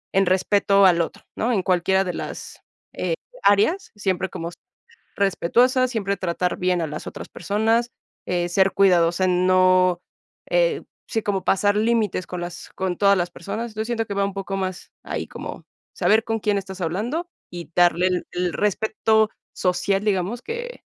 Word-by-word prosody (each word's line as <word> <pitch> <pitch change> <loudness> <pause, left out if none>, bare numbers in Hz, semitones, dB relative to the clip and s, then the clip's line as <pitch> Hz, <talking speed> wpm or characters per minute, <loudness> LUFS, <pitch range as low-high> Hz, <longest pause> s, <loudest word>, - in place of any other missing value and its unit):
en 195 - +4
respeto 195 +1 +3
al 170 -2 +5
otro, 165 - -5
¿no? 240 +3 0
En 190 -4 +1
cualquiera 190 +1 +2
de 180 - -3
las, - - -7 0.3
eh, - - -1 0.3
áreas, 210 - +3
siempre 190 -2 -1
como 170 +1 -5 0.6
respetuosas, 245 +7 +2
siempre 200 -4 -1
tratar 180 0 -1
bien 180 -1 +1
a 160 - -1
las 150 +1 -6
otras - - -7
personas, 225 +6 0 0.4
eh, 175 -1 0
ser 190 +2 +3
cuidadosa, 180 -1 +3
no 185 0 +3 0.5
eh, - - +2 0.2
sí, 225 - -1
como 195 -3 -1
pasar 205 +1 +2
límites 215 -4 +1
con 180 - -5
las 175 0 -7
con 185 -2 -2
todas 200 -1 +4
las 175 0 -1
personas, 225 +2 -6
yo 220 - -1
siento 225 -1 -1
que 205 - -5
va 200 - +1
un 195 - -4
poco 195 -1 -4
más 185 -1 -4
ahí - - -4
como - - -8 0.3
saber 220 +1 +3
con 225 0 -2
quién 210 -1 +1
estás 190 -1 -6
hablando 230 - -2 0.2
y 175 -2 -8
darle 175 0 +4
el 180 -1 -1
el 180 -1 -1
respeto 220 +1 +1 0.2
social, 195 +2 0
digamos, 205 +4 0
que 480 - -6
195 Hz, 165 wpm, -23 LUFS, 180-220 Hz, 0.6 s, al